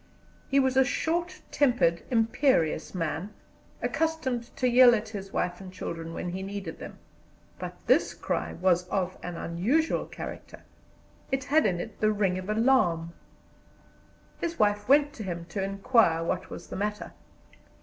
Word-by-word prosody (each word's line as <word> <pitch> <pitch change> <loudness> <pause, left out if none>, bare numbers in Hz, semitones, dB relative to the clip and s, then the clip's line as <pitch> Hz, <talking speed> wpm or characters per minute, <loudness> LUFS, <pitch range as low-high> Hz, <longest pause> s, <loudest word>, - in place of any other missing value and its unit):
He 275 - +4
was 265 -1 +2
a 265 - +7
short 340 +6 -1
tempered, 245 - +2
imperious 225 - +1
man, 165 +3 -2 0.5
accustomed 315 -7 -1
to 255 - +1
yell 245 0 +7
at 220 0 -4
his 195 -3 -7
wife 180 +1 -2
and 185 -1 -9
children 165 -3 -6
when 175 - -4
he 185 +2 -4
needed 195 -3 -6
them; - - -9 0.6
but - - -6
this - - +3
cry - - -2
was 180 0 +1
of 185 -1 -1
an 175 -1 -5
unusual 230 - 0
character, - - -8 0.7
it 270 0 0
had 290 -1 +3
in 175 -3 -1
it - - -7
the 215 0 +3
ring 195 -3 0
of 185 +2 -8
alarm. 215 -8 +2 1.3
His 335 -1 -3
wife 205 +1 +1
went 290 +1 +5
to 230 - -7
him 170 -3 -5
to 200 - -3
inquire 195 -3 +2
what 185 +2 -2
was - - -8
the - - -6
matter. 210 +2 -3
205 Hz, 155 wpm, -28 LUFS, 180-260 Hz, 1.3 s, a